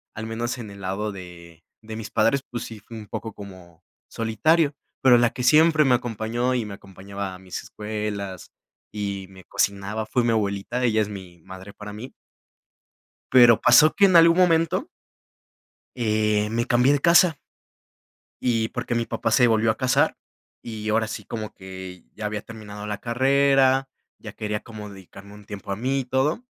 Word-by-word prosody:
al 110 - -5
menos 120 +3 -3
en 110 -4 -8
el 100 0 -12
lado 95 +3 -3
de 85 -4 -12 0.2
de 110 0 -8
mis 110 - -7
padres, 115 +5 +2
pues 120 - -5
sí, 110 -2 -9
fue 115 +3 -11
un 110 - -9
poco 110 +2 -6
como 95 -5 -13 0.3
solitario, 140 +8 +1 0.3
pero 125 -2 +6
la 120 0 +3
que 125 - -5
siempre 155 +3 +5
me 125 -2 +5
acompañó 120 +1 -2
y 120 -3 -1
me 105 - -7
acompañaba 100 0 -8
a - - -13
mis 95 -1 -7
escuelas 105 -3 -5 0.4
y 100 -2 -4
me 95 -1 -15
cocinaba, 100 +4 -2
fue 120 +3 0
mi 115 - +2
abuelita, 100 +3 -1
ella 110 -3 +2
es 105 - -2
mi 95 -4 -10
madre 95 +2 -11
para 105 -1 -9
mí. 120 +5 -9 1.2
Pero, 120 -3 +7
pasó 150 +6 +6
que 200 - +4
en 185 -3 +6
algún 165 0 +7
momento 180 - +2 1.1
eh, 105 -3 +1
me 115 +1 0
cambié 125 +2 +3
de 145 - +2
casa 170 -1 +5 1.1
y 115 -2 +1
porque 120 - -3
mi 115 0 -1
papá - - -2
se 125 +2 +5
volvió 110 -1 +3
a - - -1
casar, 130 +1 +2 0.5
y 110 -2 -6
ahora 110 +1 +1
sí 110 - -6
como 110 -2 -6
que 95 -2 -10
ya 105 -1 -4
había 105 -1 -4
terminado 105 -2 -9
la 105 -1 -3
carrera, 135 +2 +3 0.3
ya - - -9
quería 105 0 -3
como 105 -2 -9
dedicarme 100 +1 -13
un 105 - -14
tiempo 100 -1 -9
a 100 - -1
mí 130 +4 -1
y 130 - -4
todo, 135 - 0
110 Hz, 180 wpm, -24 LUFS, 100-125 Hz, 1.2 s, Pero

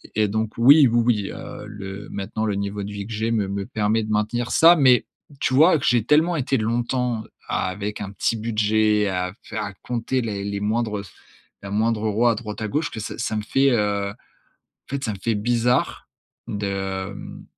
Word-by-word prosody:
et 105 -1 +3
donc 110 +1 -2
oui, 140 +4 +7
oui, 120 0 +3
oui, 105 -5 +1
heu, - - -8
le 100 0 -8
maintenant 105 +2 -3
le 105 -2 0
niveau 100 +1 -3
de 100 - -6
vie 100 -1 -5
que 115 - -7
j'ai 110 +1 -1
me 105 -4 +1
me 100 0 -3
permet 110 -1 0
de 110 - -6
maintenir 110 +3 0
ça, 170 +2 +7
mais 130 -6 +5 0.3
tu 130 - 0
vois 160 +4 +6
que - - -4
j'ai 120 -3 +3
tellement 160 +7 +3
été 135 -2 0
longtemps 120 +1 -1 0.3
avec 100 +3 -2
un 100 -1 -5
petit 100 +3 0
budget 110 -1 +2
à 90 -1 -2
faire 110 - -4
à 100 -1 -5
compter 125 +2 -2
les 100 -3 -3
les 100 0 -3
moindres 105 0 -1 0.6
la 100 - -7
moindre 110 +1 +1
euro 110 +3 +2
à 115 - +3
droite, 105 -1 -7
à 110 - -1
gauche 150 +9 -1
que 110 - -6
ça 105 - -6
ça 115 -2 -2
me 105 - -1
fait, 135 +5 +3
heu, 100 -3 +1
en - - -11 0.8
fait, 140 0 -3
ça 110 - -1
me 100 - -7
fait 115 -1 +1
bizarre 120 +3 0 0.4
de, 100 0 -3 0.4
hem, 100 - -10
110 Hz, 205 wpm, -23 LUFS, 105-120 Hz, 0.8 s, oui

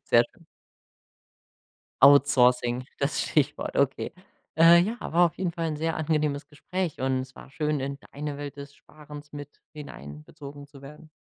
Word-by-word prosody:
Sehr - - +5
schön. - - -23 1.6
Outsourcing, 125 -3 +5
das 140 +1 0
Stichwort, 145 -1 -1
okay. 140 -1 0 0.5
Äh, 170 +1 +8
ja, 215 +7 -1
war 175 +2 +3
auf 165 - -6
jeden 180 -3 -2
Fall 165 -1 -3
'n 155 -2 -3
sehr 160 +1 -2
angenehmes 150 -2 -1
Gespräch, 175 +2 -4
und 130 0 0
es 130 0 -9
war - - -13
schön, 150 0 -1
in 140 +1 -4
deine 145 0 -5
Welt 145 -1 -7
des 140 0 -10
Sparens 150 -1 -13
mit 145 -1 -10
hineinbezogen 140 - -10
zu 140 -1 -16
werden. 150 +3 -13
145 Hz, 155 wpm, -26 LUFS, 140-155 Hz, 1.6 s, Äh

